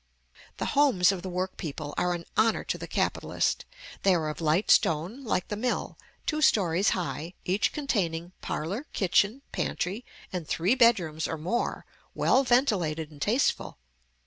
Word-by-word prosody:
The - - -2
homes 250 -11 +5
of 190 -2 -4
the 185 - -5
work 185 +1 -3
people 150 -3 -5
are 180 0 +1
an 170 -1 -7
honor 220 0 +3
to - - -2
the - - -6
capitalist. - - -1 0.4
They 195 -2 +4
are 155 -2 -1
of 150 - -6
light 160 +5 +2
stone, 175 - +2
like 200 -6 -1
the 210 - -2
mill, 245 +4 -2 0.3
two 305 -1 -1
stories 190 - +3
high, 170 -1 -4
each 190 +3 +1
containing 175 - -2
parlor, 195 - -3
kitchen, 205 +7 +2
pantry, 200 +7 -2 0.3
and 175 -4 -4
three 180 +8 +2
bedrooms 190 -11 +3
or 165 - -3
more, 185 +10 -2 0.3
well 265 - +3
ventilated 185 - +1
and 145 -2 -15
tasteful. 230 - +1
185 Hz, 155 wpm, -28 LUFS, 165-230 Hz, 0.4 s, homes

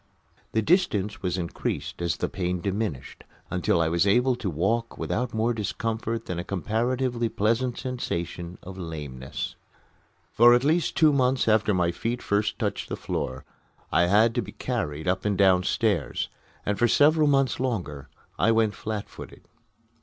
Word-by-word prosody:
The 110 - +2
distance 105 - +1
was 90 -2 -1
increased 85 0 -4
as 85 -4 0
the - - -1
pain 90 -1 -2
diminished, 100 - -3 0.3
until 90 -1 +1
I 80 - +2
was 85 +4 +2
able 125 +5 +3
to 100 - -3
walk 100 +9 -1
without 125 +3 -2
more 115 +2 +1
discomfort 115 +1 -3
than 90 -1 -4
a - - -3
comparatively 120 +5 -1
pleasant 115 +4 0
sensation 90 -8 -4
of 95 +1 -9
lameness. 75 -6 -6 0.8
For 120 +1 +7
at 120 - +1
least 160 +4 +1
two 155 -2 +5
months 130 -2 +2
after 110 -1 +3
my 90 -3 +2
feet 120 +7 -3
first 105 +1 0
touched - - -2
the - - -3
floor 65 0 -4 0.5
I 85 - +4
had 110 +5 +4
to 120 - 0
be 100 - -9
carried 75 +3 -3
up 90 - +1
and 105 -2 0
downstairs, 95 - +2 0.4
and 100 0 -1
for 120 - +4
several 150 +4 +4
months 135 -3 +2
longer 90 - -3 0.3
I 115 - +4
went 110 -2 +2
flat 105 -1 -4
footed. - - -11
105 Hz, 160 wpm, -26 LUFS, 90-120 Hz, 0.8 s, For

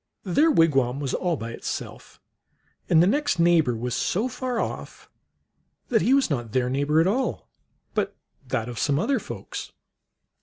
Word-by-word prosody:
Their 285 - +3
wigwam 135 - +3
was 140 -3 -3
all 175 -3 0
by 115 -1 -6
itself, - - -7 0.7
and 165 0 +6
the - - +5
next 285 +1 +1
neighbor 165 -7 +3
was 120 +2 -3
so 210 - 0
far 250 -1 -3
off - - -5 0.8
that 225 -3 +3
he - - 0
w 265 - +6
r - - +6
as 275 - +2
not 120 -8 -3
their 125 -1 +1
neighbor 145 +3 +2
at 165 - +4
all, 245 +8 -1 0.5
but - - -1 0.3
that 115 -2 -1
of 120 -1 -6
some 140 -2 +1
other 265 - +1
folks. - - -7
165 Hz, 175 wpm, -25 LUFS, -, 0.8 s, and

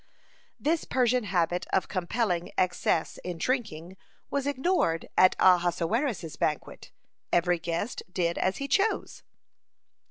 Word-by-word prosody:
This 320 +2 0
Persian 250 -2 +1
habit 180 -2 0
of 190 - +1
compelling 185 -1 -1
excess 175 -2 0
in 180 -2 -4
drinking 190 - -3 0.3
was 280 0 -1
ignored 275 - 0
at 185 - +5
Ahasuerus's 180 - +2
banquet; 150 -2 -3 0.4
every 175 0 +2
guest 170 +7 -3
did 170 -2 -1
as 190 - 0
he 275 - -4
chose. 395 +10 0
185 Hz, 115 wpm, -28 LUFS, 170-250 Hz, 0.4 s, at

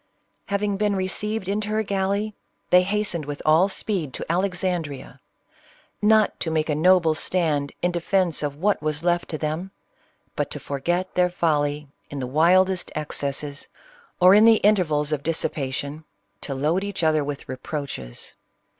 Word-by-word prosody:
Having 200 0 -1
been 205 0 +1
received 195 +2 -2
into 210 +1 -2
her 215 +1 0
gal 195 -2 -1
ley, 210 +2 -1 0.4
they 180 0 +7
hastened 195 -4 -1
with 145 0 -5
all 160 +5 +5
speed 190 - -2
to - - -5
Alexandrea, 175 -6 -2 0.4
— - - -31 0.2
not 215 - 0
to 165 - -1
make 160 0 0
a - - +2
noble 165 +1 +4
stand 155 -4 0
in 175 - +2
defence 175 -1 0
of 145 -2 -3
what 195 +5 0
was 155 0 -2
left 175 0 0
to 155 - -2
them, 155 +5 -3 0.7
but - - -1
to - - -5
forget 175 +7 -2
their 180 0 +3
folly 150 -4 0 0.2
in 145 - -7
the 130 - -3
wildest 180 +7 +3
excesses, 145 -1 -3 0.5
or 180 +1 +7
in 210 +2 +7
the 230 -1 +7
intervals 155 -8 +2
of 150 -2 -1
dissipation, 145 -1 -3 0.4
to 135 - -4
load 155 +8 0
each 200 -4 -3
other 155 -2 +3
with 145 0 -6
reproaches. 130 - -6
170 Hz, 160 wpm, -24 LUFS, 150-190 Hz, 0.7 s, they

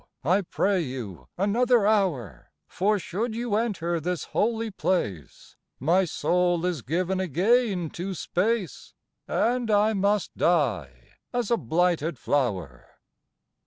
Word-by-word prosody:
I 180 +8 +3
pray 190 +1 0
you 110 - -6
another 230 +3 +3
hour, 160 - 0 0.2
For 210 +3 +1
should 215 +5 -3
you 235 -2 -3
enter 180 -7 -1
this 175 +2 -2
Holy 225 0 -1
place, 105 - -3 0.2
My 175 +8 +3
soul 175 +2 +1
is 175 -6 -1
given 180 +8 -1
again 190 - +1
to 185 +2 -5
space, 195 +3 -2 0.3
And 240 0 0
I 210 +1 +3
must 200 -1 0
die 110 - 0
as 245 -2 -2
a 235 - +4
blighted 165 - 0
flower." 95 - -2
180 Hz, 120 wpm, -26 LUFS, 150-210 Hz, 0.3 s, a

